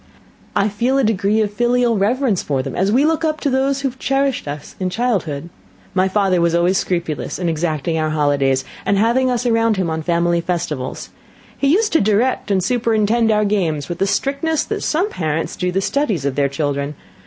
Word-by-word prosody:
I 205 0 +3
feel 235 +6 0
a 275 - +2
degree 215 0 +1
of 205 -1 -1
filial 240 +1 +2
reverence 215 +1 +1
for 135 -3 -1
them, - - -5
as 195 +3 +1
we 265 +6 +3
look 320 +1 +1
up 310 -1 0
to 285 - 0
those 270 +1 +1
who 275 - 0
have 260 +1 -15
cherished 270 - 0
us 145 +1 -7
in 185 -1 -1
childhood. 180 - -2 0.4
My 185 0 +2
father 190 -2 +1
was 170 0 +2
always 175 +3 +2
scrupulous 170 -4 -2
in 180 - -2
exacting 160 0 -1
our 155 0 0
holidays, 140 -3 +1 0.2
and 200 - +1
having 240 +5 +2
us 250 0 -1
around 230 -2 +2
him 180 -3 -1
on 160 0 -2
family 170 +1 +1
festivals. 165 -7 -4 0.4
He 280 - 0
used 420 +9 +2
to 325 - +4
direct 215 +4 +1
and 190 -2 +1
superintend 225 0 +1
our 210 -1 +3
games 170 -8 -1
with 175 - -4
the 195 - +2
strictness 280 - 0
that - - -4
some 345 +6 +1
parents 160 - -2
do 180 0 -1
the 190 +2 0
studies 210 - -1
of 140 - 0
their 140 0 +1
children. 140 0 -2
195 Hz, 200 wpm, -19 LUFS, 165-245 Hz, 0.4 s, to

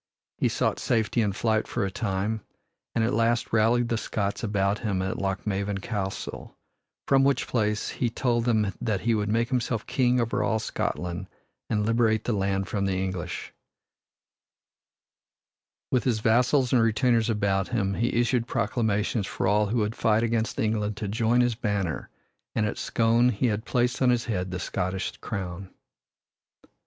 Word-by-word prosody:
He - - +2
sought - - 0
safety 115 0 +1
in 105 -2 +1
flight 110 +2 0
for - - -1
a 95 - -3
time, 100 +2 -2 0.5
and 115 - +2
at 115 - +1
last 115 +1 +1
rallied 115 +2 +3
the 115 -2 0
Scots 100 -2 -2
about 100 -1 +1
him 100 -4 -1
at 95 - -3
Lochmaven 100 +1 -1
Castle, 95 -2 -5 0.5
from 135 -1 +5
which 135 -3 +2
place 105 -2 0
he 120 - -1
told 120 0 0
them 110 -5 +2
that 110 -5 -1
he 115 +1 +2
would 105 -1 0
make 115 +2 +1
himself 125 -4 -1
King 125 -1 +2
over 115 -1 0
all 110 - +1
Scotland 90 -4 -3 0.4
and 105 -2 +1
liberate 115 -1 +2
the 120 - -1
land 95 -1 0
from 100 -2 -1
the 95 - 0
English 95 -2 -3
yoke. - - -34 2.4
With 125 - +2
his 120 -4 +2
vassals 125 +4 +3
and 125 - +5
retainers 115 0 +2
about 100 -3 +1
him, 100 -5 0
he 115 +4 0
issued 120 -1 +1
proclamations 110 -2 0
for - - -3
all 105 +2 +3
who 115 +4 -1
would 105 -1 0
fight 110 0 +2
against 115 -1 0
England 105 -1 0
to 105 - -3
join 115 +4 +2
his 120 -1 +2
banner, 100 -6 -2 0.5
and 110 - +2
at 105 - -3
Scone 115 +2 +3
he 115 +1 0
had 110 -1 0
placed 125 0 0
on 130 - +5
his 120 -1 +2
head 95 -5 -2
the 90 - -3
Scottish 95 +1 -2
crown. 95 -3 -5
110 Hz, 165 wpm, -26 LUFS, 100-120 Hz, 2.4 s, from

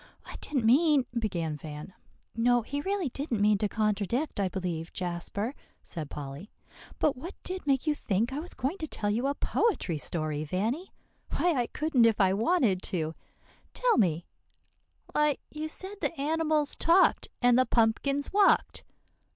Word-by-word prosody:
"I - - -9
didn't 265 -6 -1
mean," 285 +2 +5
began 175 -10 -2
Van. 150 +4 -8 0.4
"No, 240 +1 +3
he 285 +5 -3
really 385 -2 -1
didn't 255 -3 -3
mean 205 0 +4
to 210 - +1
contradict, 215 - -1
I 195 -2 +1
believe, 175 -3 -4
Jasper," 185 +6 -3 0.3
said 155 -4 -6
Polly. 145 +7 -7 0.5
"But 300 - +2
what 335 +10 -8
did 370 -4 -5
make 270 0 +2
you 305 - +2
think 230 -2 -1
I 285 - -2
was 350 +3 -3
going 295 +10 -2
to 315 - -3
tell 205 -7 -2
you 235 +6 0
a 280 - 0
poetry 240 - 0
story, 155 -1 -2
Vanny? 220 - -2 0.5
Why 350 -1 +3
I 245 -4 0
couldn't 300 -6 +2
if 225 -2 +3
I 190 -2 +4
wanted 225 - +2
to. 160 -5 -3 0.6
Tell - - +3
me" 170 -5 +1 0.9
"Why, 300 -1 +2
you 305 +1 -4
said 380 +5 -5
the 330 - -2
animals 310 0 +1
talked, 345 +3 +4
and 245 -1 +5
the 255 - +3
pumpkins 265 +7 +1
walked." 405 -1 +3
240 Hz, 160 wpm, -29 LUFS, 190-300 Hz, 0.9 s, mean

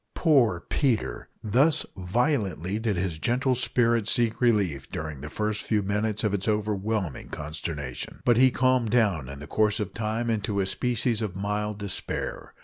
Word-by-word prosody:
Poor 125 - +3
Peter! 125 -1 -1
Thus 135 +9 +3
violently 100 - 0
did 110 -3 0
his 90 -3 -2
gentle 130 - +1
spirit 120 -2 +1
seek 115 -1 +2
relief 100 - +1
during 80 -3 -5
the 75 - -6
first 105 +4 -1
few 105 -2 +1
minutes 105 +2 -1
of 105 -2 +1
its 100 +1 0
overwhelming 105 - -1
consternation. 75 -3 -5
But 120 -2 +4
he 130 +1 +7
calmed 130 -2 +2
down 100 - +2
in 70 - -7
the 75 - -8
course 105 +3 +1
of 105 - -3
time 115 +1 -1
into 105 -2 -1
a 95 - +2
species 120 +2 0
of 105 -5 -3
mild 105 +1 -2
despair. 100 -2 -4
105 Hz, 160 wpm, -26 LUFS, 95-120 Hz, -, he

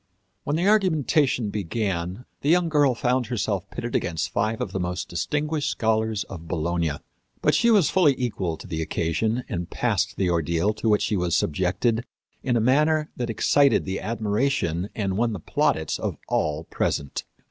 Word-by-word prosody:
When 145 - 0
the 175 +4 +1
argumentation 155 - +2
began 95 +1 -3 0.2
the 145 - 0
young 175 0 +4
girl 145 -5 +3
found 125 0 0
herself 100 -5 -2
pitted 120 0 -5
against 80 -3 -1
five 110 +1 0
of - - -3
the 95 - -2
most 90 0 -3
distinguished 150 - -1
scholars 110 -4 0
of 85 -3 -10
Bologna. 85 -1 -1 0.5
But - - +4
she 235 - +3
was 200 -10 +4
fully 155 -8 +4
equal 100 -9 -2
to - - -11
the 80 -1 -3
occasion 100 +10 -1
and 90 -6 -4
passed 100 -4 0
the 95 - +1
ordeal 85 +4 +1
to 110 +1 -1
which 105 -1 +3
she 105 - 0
was 90 -2 +1
subjected 95 +8 +1 0.4
in 125 -3 +1
a - - +3
manner 150 +6 +2
that 120 -1 -3
excited 140 +3 +3
the 95 0 -3
admiration 105 - -1
and 95 -3 -1
won 115 0 +1
the 100 - -4
plaudits 80 0 0
of - - -3
all 75 +1 0
present. 70 -3 -2
110 Hz, 170 wpm, -25 LUFS, 90-130 Hz, 0.5 s, young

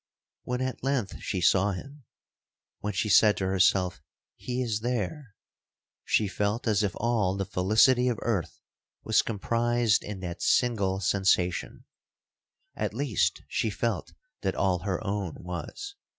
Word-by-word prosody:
'When 125 0 -2
at 130 -2 -3
length 135 -7 -1
she 95 -3 -2
saw 95 +3 +3
him,—when 115 -3 -11
she 95 +3 0
said 105 +1 +5
to 95 - -1
herself, 95 -1 +2 0.3
He 125 0 -3
is 110 -3 -1
there,—she 115 - -4
felt 105 +4 -1
as 105 -2 +3
if 100 -1 -1
all 105 -5 0
the 95 - -1
felicity 110 +7 +3
of 120 -3 0
earth 105 -9 -2 0.4
was - - +3
comprised 115 +1 +1
in 105 -2 -6
that 85 -1 -6
single 100 -6 +2
sensation,—at 95 -2 +1 1.1
least - - 0
she - - -1
felt - - -2 0.3
that - - -1
all 95 -2 +1
her 95 +3 -3
own 100 -4 -2
was. 90 - -6
105 Hz, 130 wpm, -28 LUFS, 95-120 Hz, 1.1 s, said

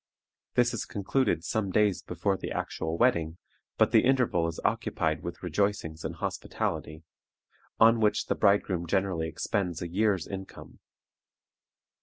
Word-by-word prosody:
This 120 0 +3
is 115 - -3
concluded 100 - 0
some 100 +3 -1
days 105 0 +2
before 90 +3 -1
the - - -6
actual 80 +1 -3
wedding, 85 -9 +2 0.4
but - - +4
the - - +5
interval 125 -10 +2
is 85 - -5
occupied 80 0 0
with 85 +1 -7
rejoicings 90 -3 -1
and 80 +1 -4
hospitality, 80 -1 -4 0.8
on 115 +1 +6
which 105 -1 +2
the - - 0
bridegroom 100 -4 +2
generally 95 -3 0
expends 90 0 -2
a 85 - -4
year's 100 +2 +1
income. 95 -1 -9
95 Hz, 135 wpm, -28 LUFS, 85-105 Hz, 0.8 s, on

